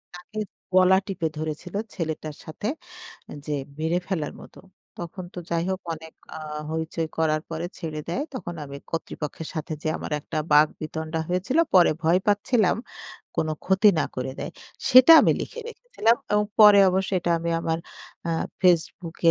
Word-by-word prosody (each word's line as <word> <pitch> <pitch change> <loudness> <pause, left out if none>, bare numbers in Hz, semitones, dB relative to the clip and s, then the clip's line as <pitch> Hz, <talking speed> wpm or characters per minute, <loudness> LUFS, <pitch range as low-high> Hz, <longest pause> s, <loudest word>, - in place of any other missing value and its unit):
তাকে 210 +5 -8 0.3
গলা 185 0 +6
টিপে 180 -4 -2
ধরেছিল 155 +4 -5 0.2
ছেলেটার 155 -3 -4
সাথে 160 +6 -5 0.8
যে 150 - -1 0.2
মেরে 160 +3 +1
ফেলার 165 -6 -2
মত। - - -14 0.4
তখন 175 +2 -6
তো - - -6
যাই 170 -1 +1
হোক 190 0 -2
অনেক 160 0 -12 0.2
আ - - -6 0.3
হইচই 160 0 -2
করার 155 -1 +2
পরে 165 +2 -3
ছেড়ে 155 -2 -4
দেয়। 255 +12 -1
তখন 175 -9 -5
আমি 140 0 -8
কর্তৃপক্ষের 160 -1 -5
সাথে 155 0 -4
যে 155 - -1
আমার - - -6
একটা 155 +1 -4
বাক 150 +1 +7
বিতণ্ডা 160 +1 -4
হয়েছিল। 185 - 0 0.2
পরে 180 -2 +7
ভয় 165 +3 +4
পাচ্ছিলাম 205 0 +2 0.6
কোন 155 - 0 0.2
ক্ষতি 190 +3 +5
না - - +2
করে 130 +1 -3
দেয়। - - -4 0.4
সেটা 255 +5 +9
আমি - - +4
লিখে 475 - -6
রেখেছিলাম 470 - +1 0.2
এবং 210 0 +3 0.2
পরে 210 -1 +9
অবশ্য 190 +1 0
এটা 175 0 -1
আমি 170 +1 -2
আমার 165 -1 -1 0.5
আ - - +1 0.3
FaceBook 175 -1 +1
170 Hz, 160 wpm, -25 LUFS, 160-190 Hz, 0.8 s, সেটা